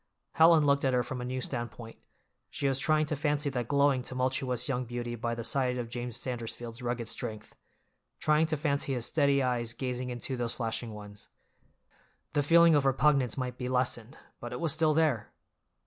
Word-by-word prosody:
Helen 160 Hz, -1 st, +6 dB
looked 140 Hz, 0 st, +3 dB
at 130 Hz, -2 st, +2 dB
her 125 Hz, -, +2 dB
from 125 Hz, +1 st, -5 dB
a -, -, -4 dB
new 130 Hz, +1 st, -3 dB
standpoint—she 120 Hz, +3 st, -7 dB
was 135 Hz, -1 st, +1 dB
trying 155 Hz, +2 st, +3 dB
to 155 Hz, -, -2 dB
fancy 145 Hz, 0 st, 0 dB
that 125 Hz, -3 st, -3 dB
glowing, 140 Hz, -1 st, +3 dB
tumultuous 130 Hz, -1 st, -1 dB
young 130 Hz, -2 st, -1 dB
beauty 120 Hz, 0 st, -5 dB
by 115 Hz, 0 st, -2 dB
the 115 Hz, -, -5 dB
side 130 Hz, 0 st, 0 dB
of 120 Hz, -2 st, -5 dB
James 120 Hz, -1 st, -5 dB
Sandersfield's 120 Hz, -1 st, -5 dB
rugged 120 Hz, -1 st, -3 dB
strength, 110 Hz, -1 st, -5 dB, 0.7 s
trying 155 Hz, +1 st, +3 dB
to 155 Hz, -1 st, -1 dB
fancy 140 Hz, -2 st, 0 dB
his 120 Hz, -2 st, -1 dB
steady 140 Hz, -3 st, +2 dB
eyes 120 Hz, -2 st, -1 dB
gazing 125 Hz, 0 st, -3 dB
into 125 Hz, +2 st, -3 dB
those 120 Hz, -1 st, -2 dB
flashing 115 Hz, -1 st, -3 dB
ones. 105 Hz, -1 st, -10 dB, 1.1 s
The 145 Hz, -, +2 dB
feeling 170 Hz, +3 st, +6 dB
of 145 Hz, -2 st, +4 dB
repugnance 135 Hz, -2 st, +2 dB
might 125 Hz, -1 st, -4 dB
be 125 Hz, -, -3 dB
lessened, 125 Hz, +1 st, -1 dB, 0.2 s
but 120 Hz, -, -7 dB
it 125 Hz, -, -5 dB
was 165 Hz, -4 st, +2 dB
still 155 Hz, -1 st, +2 dB
there! 155 Hz, -9 st, +1 dB
125 Hz, 180 wpm, -30 LUFS, 120-140 Hz, 1.1 s, Helen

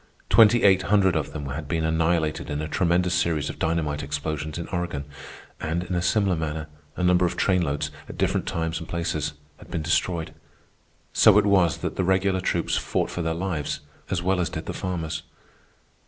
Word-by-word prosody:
Twenty 115 Hz, +2 st, +6 dB
eight 95 Hz, -2 st, +6 dB
hundred 95 Hz, -2 st, +3 dB
of 80 Hz, -2 st, -1 dB
them 75 Hz, -2 st, -6 dB
had 75 Hz, +3 st, -5 dB
been 80 Hz, 0 st, 0 dB
annihilated 80 Hz, -1 st, 0 dB
in 75 Hz, -, -2 dB
a 75 Hz, -, -3 dB
tremendous 90 Hz, +1 st, +1 dB
series 85 Hz, -4 st, 0 dB
of -, -, -14 dB
dynamite 80 Hz, -3 st, 0 dB
explosions 75 Hz, +2 st, -3 dB
in 85 Hz, -, -5 dB
Oregon, 85 Hz, -5 st, -3 dB, 0.5 s
and 80 Hz, +2 st, -2 dB
in 90 Hz, +1 st, -5 dB
a 90 Hz, -, +1 dB
similar 95 Hz, 0 st, +2 dB
manner, 80 Hz, -1 st, -3 dB, 0.3 s
a 90 Hz, -, -2 dB
number 90 Hz, 0 st, +4 dB
of 85 Hz, -, 0 dB
train 90 Hz, -2 st, +2 dB
loads, 75 Hz, -2 st, -1 dB, 0.2 s
at -, -, -8 dB
different -, -, 0 dB
times 80 Hz, 0 st, -2 dB
and 80 Hz, -, -9 dB
places, 85 Hz, -3 st, -2 dB, 0.2 s
had -, -, -15 dB
been 80 Hz, -, -3 dB
destroyed. 85 Hz, +1 st, 0 dB, 0.8 s
So -, -, +6 dB
it 105 Hz, -, +4 dB
was 90 Hz, -7 st, +3 dB
that -, -, -4 dB
the -, -, +1 dB
regular 95 Hz, 0 st, +2 dB
troops -, -, 0 dB
fought -, -, -1 dB
for 90 Hz, -, -3 dB
their 80 Hz, -1 st, -1 dB
lives 85 Hz, -5 st, -2 dB, 0.3 s
as 90 Hz, -2 st, -1 dB
well 95 Hz, 0 st, +1 dB
as 85 Hz, -, 0 dB
did -, -, -5 dB
the -, -, -4 dB
farmers. 80 Hz, -4 st, -3 dB
85 Hz, 195 wpm, -25 LUFS, 80-90 Hz, 0.8 s, Twenty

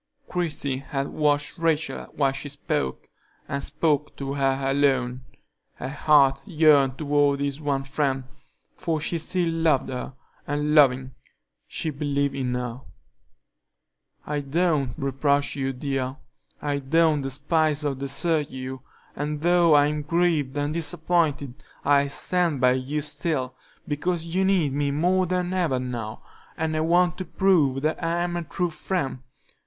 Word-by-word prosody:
Christie 150 Hz, -6 st, -1 dB
had 135 Hz, 0 st, -3 dB
watched 145 Hz, 0 st, 0 dB
Rachel 165 Hz, -2 st, 0 dB
while 140 Hz, -2 st, +2 dB
she 135 Hz, +2 st, -6 dB
spoke, 70 Hz, -, -3 dB, 0.4 s
and 140 Hz, 0 st, -3 dB
spoke 150 Hz, -2 st, 0 dB
to 135 Hz, 0 st, -4 dB
her 135 Hz, -1 st, +1 dB
alone; 135 Hz, -2 st, +1 dB, 0.5 s
her 130 Hz, -, -5 dB
heart 140 Hz, -2 st, +4 dB
yearned 150 Hz, -6 st, +4 dB
toward 145 Hz, -2 st, +2 dB
this 140 Hz, +1 st, -2 dB
one 140 Hz, -2 st, 0 dB
friend, 135 Hz, -1 st, -1 dB, 0.5 s
for 165 Hz, -4 st, -1 dB
she 165 Hz, +2 st, -2 dB
still 175 Hz, +2 st, 0 dB
loved 165 Hz, -4 st, +1 dB
her, 130 Hz, 0 st, -5 dB, 0.3 s
and, 150 Hz, +1 st, 0 dB
loving, 130 Hz, -3 st, +4 dB, 0.6 s
she 160 Hz, -, -3 dB
believed 140 Hz, -1 st, -1 dB
in 130 Hz, -2 st, -2 dB
her. 125 Hz, 0 st, -4 dB, 1.4 s
"I 150 Hz, 0 st, -2 dB
don't 145 Hz, -3 st, 0 dB
reproach 140 Hz, 0 st, 0 dB
you, 135 Hz, -1 st, -1 dB
dear: 135 Hz, 0 st, -3 dB, 0.4 s
I 145 Hz, -1 st, -1 dB
don't 155 Hz, +2 st, +2 dB
despise 150 Hz, +3 st, 0 dB
or 145 Hz, -, +1 dB
desert 140 Hz, +3 st, 0 dB
you, 130 Hz, 0 st, -6 dB, 0.3 s
and 150 Hz, +1 st, -3 dB
though 170 Hz, -2 st, +5 dB
I'm 150 Hz, +1 st, +3 dB
grieved 155 Hz, -3 st, +1 dB
and 145 Hz, +1 st, -1 dB
disappointed, 160 Hz, -4 st, 0 dB, 0.3 s
I'll 140 Hz, 0 st, +4 dB
stand 170 Hz, -1 st, 0 dB
by 125 Hz, 0 st, +5 dB
you 130 Hz, +4 st, -1 dB
still, 150 Hz, -3 st, -2 dB, 0.3 s
because 165 Hz, +3 st, -1 dB
you 185 Hz, +3 st, 0 dB
need 180 Hz, -8 st, +2 dB
me 145 Hz, 0 st, 0 dB
more 180 Hz, +6 st, +2 dB
than 180 Hz, 0 st, -1 dB
ever 165 Hz, -9 st, +1 dB
now, 120 Hz, -3 st, -5 dB, 0.3 s
and 160 Hz, -1 st, -1 dB
I -, -, 0 dB
want 175 Hz, +3 st, +2 dB
to 185 Hz, -, -3 dB
prove 155 Hz, -9 st, +2 dB
that 155 Hz, +2 st, -1 dB
I 170 Hz, +1 st, 0 dB
am 175 Hz, 0 st, -2 dB
a 175 Hz, -, -1 dB
true 175 Hz, +2 st, -2 dB
friend. 155 Hz, -6 st, -3 dB
145 Hz, 145 wpm, -25 LUFS, 135-165 Hz, 1.4 s, though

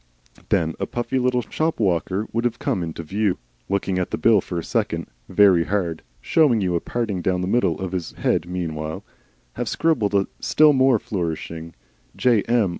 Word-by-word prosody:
Then 80 Hz, 0 st, +1 dB
a -, -, -2 dB
puffy 120 Hz, +2 st, -2 dB
little 125 Hz, -1 st, +1 dB
shop 155 Hz, +8 st, -2 dB
walker 95 Hz, +1 st, 0 dB
would 115 Hz, +1 st, 0 dB
have 120 Hz, -2 st, 0 dB
come 90 Hz, -, -1 dB
into 85 Hz, 0 st, -5 dB
view, 100 Hz, +4 st, 0 dB, 0.3 s
looked 100 Hz, -1 st, -1 dB
at 90 Hz, -2 st, 0 dB
the -, -, -2 dB
bill 110 Hz, -4 st, +4 dB
for 90 Hz, -, -5 dB
a 85 Hz, -, -2 dB
second, -, -, -1 dB, 0.2 s
very 95 Hz, -5 st, +5 dB
hard 90 Hz, -5 st, -1 dB, 0.2 s
(showing 145 Hz, -8 st, +3 dB
you 90 Hz, -3 st, 0 dB
a 85 Hz, -, +2 dB
parting 110 Hz, -5 st, -3 dB
down 90 Hz, 0 st, 0 dB
the 90 Hz, -, -2 dB
middle 95 Hz, -7 st, +1 dB
of 95 Hz, -2 st, -4 dB
his 90 Hz, -3 st, -4 dB
head 85 Hz, -, 0 dB
meanwhile), 80 Hz, -3 st, -4 dB, 0.5 s
have -, -, -2 dB
scribbled 120 Hz, -12 st, +1 dB
a 100 Hz, -1 st, +3 dB
still 155 Hz, -1 st, +5 dB
more 130 Hz, -2 st, +4 dB
flourishing 85 Hz, -4 st, -4 dB, 0.4 s
J. 120 Hz, -4 st, +3 dB
M. 115 Hz, -4 st, +3 dB
95 Hz, 185 wpm, -22 LUFS, 85-120 Hz, 0.5 s, very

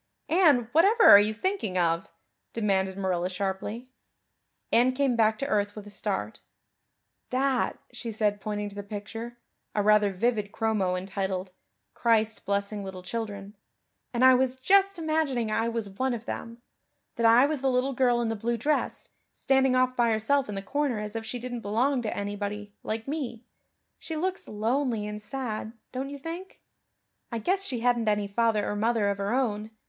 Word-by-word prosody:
"Anne, 305 Hz, -9 st, +4 dB
whatever 395 Hz, +9 st, +4 dB
are 200 Hz, -, +11 dB
you 210 Hz, +1 st, +2 dB
thinking 225 Hz, -, -2 dB
of?" 165 Hz, -1 st, +1 dB, 0.4 s
demanded 195 Hz, -3 st, 0 dB
Marilla 185 Hz, -2 st, -1 dB
sharply. 195 Hz, +5 st, -4 dB, 0.8 s
Anne 245 Hz, +2 st, +4 dB
came 265 Hz, -2 st, +1 dB
back 220 Hz, -1 st, +3 dB
to 275 Hz, -, -3 dB
earth 205 Hz, -6 st, 0 dB
with 210 Hz, -1 st, -8 dB
a 205 Hz, -, -11 dB
start. -, -, -3 dB, 0.9 s
"That," 260 Hz, 0 st, +1 dB, 0.2 s
she 240 Hz, -1 st, -5 dB
said, 210 Hz, -1 st, 0 dB
pointing 210 Hz, 0 st, -3 dB
to 200 Hz, -, -11 dB
the 205 Hz, -, -4 dB
picture 225 Hz, +4 st, -7 dB, 0.4 s
a 205 Hz, -, +2 dB
rather 210 Hz, -1 st, +4 dB
vivid 210 Hz, +1 st, 0 dB
chromo 210 Hz, -5 st, 0 dB
entitled, 190 Hz, 0 st, -3 dB, 0.4 s
"Christ 220 Hz, -2 st, +1 dB
Blessing 200 Hz, +1 st, -1 dB
Little 190 Hz, -1 st, -7 dB
Children" 205 Hz, 0 st, -5 dB, 0.6 s
"and 245 Hz, +1 st, +3 dB
I 260 Hz, -, +9 dB
was 260 Hz, 0 st, +1 dB
just 390 Hz, +7 st, +3 dB
imagining 310 Hz, -8 st, 0 dB
I 225 Hz, +2 st, +1 dB
was 230 Hz, -2 st, -3 dB
one 245 Hz, +6 st, -1 dB
of 230 Hz, 0 st, -8 dB
them 230 Hz, +1 st, -6 dB, 0.5 s
that 230 Hz, -, 0 dB
I 235 Hz, +4 st, +7 dB
was 295 Hz, -2 st, -2 dB
the 270 Hz, -, +2 dB
little 255 Hz, +2 st, +1 dB
girl 245 Hz, -2 st, +2 dB
in 235 Hz, -, 0 dB
the 225 Hz, -, -1 dB
blue 235 Hz, +3 st, -1 dB
dress, 295 Hz, +7 st, -1 dB, 0.2 s
standing 265 Hz, -1 st, +2 dB
off 255 Hz, 0 st, +2 dB
by 240 Hz, -2 st, +3 dB
herself 225 Hz, +4 st, +1 dB
in 205 Hz, -, -4 dB
the 195 Hz, -, -4 dB
corner 285 Hz, 0 st, -1 dB
as 210 Hz, +1 st, -6 dB
if 225 Hz, 0 st, -4 dB
she 245 Hz, -, -4 dB
didn't 245 Hz, -1 st, -5 dB
belong 245 Hz, +6 st, +1 dB
to 220 Hz, -, -3 dB
anybody, 205 Hz, 0 st, -4 dB
like 220 Hz, +2 st, -4 dB
me. 260 Hz, -6 st, -4 dB, 0.5 s
She 320 Hz, -, -6 dB
looks 370 Hz, +4 st, -2 dB
lonely 225 Hz, +1 st, -1 dB
and 210 Hz, 0 st, -5 dB
sad, 220 Hz, -2 st, -4 dB, 0.2 s
don't 265 Hz, +2 st, -4 dB
you 285 Hz, -, -7 dB
think? 335 Hz, +6 st, -8 dB, 0.7 s
I 235 Hz, -, -2 dB
guess 375 Hz, -, 0 dB
she 250 Hz, -11 st, -3 dB
hadn't 240 Hz, -2 st, +2 dB
any 210 Hz, -1 st, +1 dB
father 215 Hz, 0 st, +1 dB
or 205 Hz, -, -2 dB
mother 220 Hz, 0 st, +1 dB
of 200 Hz, 0 st, -1 dB
her 200 Hz, +1 st, -1 dB
own. 220 Hz, -4 st, 0 dB
225 Hz, 175 wpm, -27 LUFS, 205-255 Hz, 0.9 s, are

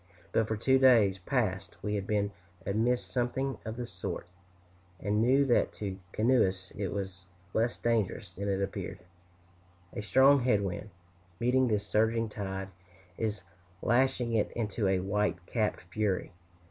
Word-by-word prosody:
But 110 Hz, -, +2 dB
for 110 Hz, -, -1 dB
two 130 Hz, +4 st, +3 dB
days 115 Hz, -7 st, +5 dB
past, 95 Hz, -4 st, -1 dB
we 105 Hz, -, -1 dB
had 100 Hz, -2 st, -2 dB
been 100 Hz, -1 st, +1 dB, 0.3 s
amidst 115 Hz, +5 st, 0 dB
something 130 Hz, +1 st, -1 dB
of 110 Hz, +1 st, -5 dB
the 125 Hz, -, -3 dB
sort, 115 Hz, -, -5 dB, 0.7 s
and 105 Hz, +2 st, +1 dB
knew 135 Hz, +4 st, +4 dB
that 125 Hz, -, +2 dB
to 100 Hz, -2 st, -4 dB
cautious 95 Hz, 0 st, -9 dB
canoeists 100 Hz, -6 st, +2 dB
it 100 Hz, -, -2 dB
was 95 Hz, -1 st, -5 dB, 0.3 s
less 115 Hz, +2 st, +1 dB
dangerous 115 Hz, -4 st, 0 dB
than 100 Hz, +3 st, -4 dB
it 100 Hz, 0 st, +1 dB
appeared. 95 Hz, -1 st, -4 dB, 1.0 s
A -, -, -3 dB
strong 130 Hz, +8 st, +5 dB
head 120 Hz, -5 st, +2 dB
wind, 100 Hz, +3 st, -4 dB, 0.5 s
meeting 125 Hz, +2 st, +3 dB
this 105 Hz, -3 st, 0 dB
surging 110 Hz, +2 st, +1 dB
tide, 95 Hz, -2 st, -4 dB, 0.5 s
is 105 Hz, -3 st, -2 dB, 0.4 s
lashing 125 Hz, 0 st, +2 dB
it 110 Hz, -2 st, +2 dB
into 110 Hz, -2 st, -1 dB
a 95 Hz, -1 st, +2 dB
white 105 Hz, +1 st, 0 dB
capped 110 Hz, 0 st, -1 dB
fury. 105 Hz, -3 st, 0 dB
105 Hz, 150 wpm, -30 LUFS, 100-120 Hz, 1.0 s, days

